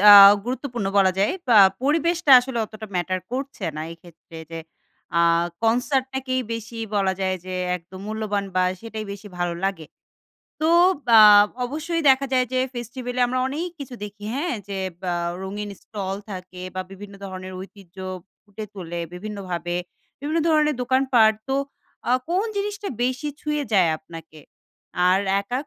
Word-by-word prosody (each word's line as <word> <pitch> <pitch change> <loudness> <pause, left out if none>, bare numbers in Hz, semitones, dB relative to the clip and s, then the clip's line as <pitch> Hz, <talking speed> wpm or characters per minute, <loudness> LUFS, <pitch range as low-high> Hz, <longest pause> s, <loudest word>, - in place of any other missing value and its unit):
The 205 +1 +10 0.3
গুরুত্বপূর্ণ 245 -3 -3
বলা 190 -1 +5
যায়। 200 - +2 0.2
বা 230 - +6 0.3
পরিবেশটা 330 +3 +1
আসলে 250 -1 -4
অতটা 215 0 -9
ম্যাটার 185 +1 -1
করছে 265 -6 -4
না, - - -3
এই - - -12
ক্ষেত্রে। 165 -1 -15
যে 165 - -5 0.6
আ - - +5 0.4
কনসার্ট 250 +4 +2
টাকেই 260 -1 -1
বেশি 230 0 -6 0.2
বলা 195 -1 +2
যায় 185 0 0
যে, 185 0 -5 0.2
একদম 185 +2 -12
মূল্যবান 215 -2 -2
বা 185 - +4 0.2
সেটাই 220 -1 -6
বেশি 205 +1 -10
ভালো 175 -1 -1
লাগে। 190 -5 -2 0.7
তো 315 - +2 0.5
আ - - +10 0.4
অবশ্যই 315 +6 -2
দেখা 265 +1 +3
যায় 255 -1 +3
যে, 255 - +1 0.2
ফেস্টিভ্যালে 245 +1 -5
আমরা 255 +1 -1
অনেক 315 +6 -3
কিছু 270 -3 -7
দেখি, 205 0 -10
হ্যাঁ? 290 +2 -1
যে 195 -1 -4 0.2
ব্যা 180 -2 -1 0.3
রঙিন 205 +2 -5
স্টল 195 -3 -4
থাকে 185 -1 -8
বা 185 - -2
বিভিন্ন 200 +1 -10
ধরনের 185 -1 -7
ঐতিহ্য 190 -2 -13 0.5
ফুটে 210 +1 -8
তোলে 175 -3 -5
বিভিন্নভাবে, 180 -3 -4 0.4
বিভিন্ন 305 +3 -1
ধরনের 305 -1 +3
দোকানপাট। 250 -3 +4 0.2
তো 265 - 0 0.6
আ - - +4 0.2
কোন 360 +3 +1
জিনিসটা 410 0 -3
বেশি 255 +4 -1
ছুঁয়ে 300 -1 -1
যায় 185 -5 +5
আপনাকে? 160 -1 -12 0.7
আর 190 +2 +4 0.2
একাক 250 +8 -4
215 Hz, 150 wpm, -23 LUFS, 190-265 Hz, 0.7 s, The